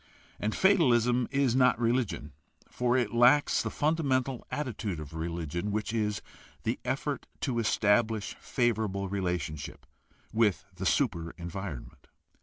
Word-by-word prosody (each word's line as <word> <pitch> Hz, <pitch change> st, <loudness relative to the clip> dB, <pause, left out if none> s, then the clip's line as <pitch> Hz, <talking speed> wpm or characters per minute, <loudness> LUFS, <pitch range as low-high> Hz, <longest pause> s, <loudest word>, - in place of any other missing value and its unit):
And 105 Hz, +1 st, -1 dB
fatalism 125 Hz, -, +4 dB
is 135 Hz, -3 st, +2 dB
not 125 Hz, -2 st, +4 dB
religion, 115 Hz, -, 0 dB, 0.4 s
for 125 Hz, 0 st, +1 dB
it 120 Hz, -4 st, 0 dB
lacks 125 Hz, +5 st, +5 dB
the -, -, -2 dB
fundamental 135 Hz, -5 st, 0 dB
attitude 110 Hz, -, -3 dB
of 75 Hz, 0 st, -8 dB
religion, 85 Hz, +3 st, -3 dB
which 110 Hz, +1 st, -2 dB
is 105 Hz, -2 st, -1 dB, 0.4 s
the -, -, -1 dB
effort -, -, -2 dB
to 120 Hz, -3 st, 0 dB
establish 110 Hz, 0 st, +2 dB
favorable 110 Hz, -5 st, 0 dB
relations 90 Hz, -6 st, -2 dB, 0.6 s
with 110 Hz, -4 st, +2 dB
the 95 Hz, +1 st, -3 dB
super 85 Hz, -, 0 dB
environment. 85 Hz, -8 st, -7 dB
110 Hz, 120 wpm, -29 LUFS, 90-125 Hz, 0.6 s, lacks